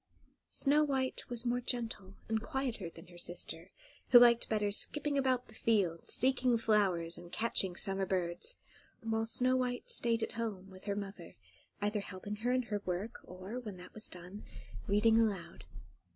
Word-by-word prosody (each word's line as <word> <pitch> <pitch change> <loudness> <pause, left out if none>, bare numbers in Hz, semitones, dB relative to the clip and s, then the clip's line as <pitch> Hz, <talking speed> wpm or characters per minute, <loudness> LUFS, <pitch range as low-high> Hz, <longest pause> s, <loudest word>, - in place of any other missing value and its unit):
Snow 295 +2 +3
White 265 -3 -1
was 240 0 -3
more 245 +1 +1
gentle, 225 -6 -3
and 220 -1 0
quieter 235 -7 -3
than 165 0 -13
her 175 -1 -11
sister, 175 0 -4 0.4
who 250 - +10
liked 240 -1 +6
better 210 -2 +1
skipping 295 +7 +2
about 260 -2 +1
the 220 - -15
fields, 195 -8 +1
seeking 255 -2 +3
flowers, 190 -7 +1
and 175 0 -12
catching 200 -5 +1
summer 195 0 0
birds; 180 - -1 0.5
while 225 0 -1
Snow 255 +3 +3
White 250 -1 -1
stayed 230 -1 +1
at - - -2
home 205 -4 -4
with 185 +1 -13
her 200 -1 -1
mother, 195 -3 -7 0.5
either 210 +1 +1
helping 200 +1 -6
her 240 +3 0
in 255 0 +2
her 210 -3 -3
work, 185 +6 -3
or, 185 +7 -7
when 210 -6 -7
that 180 0 -12
was 215 - -3
done, 180 +3 -9 0.4
reading 220 +2 +4
aloud. 200 -6 -1
220 Hz, 165 wpm, -34 LUFS, 190-245 Hz, 0.5 s, who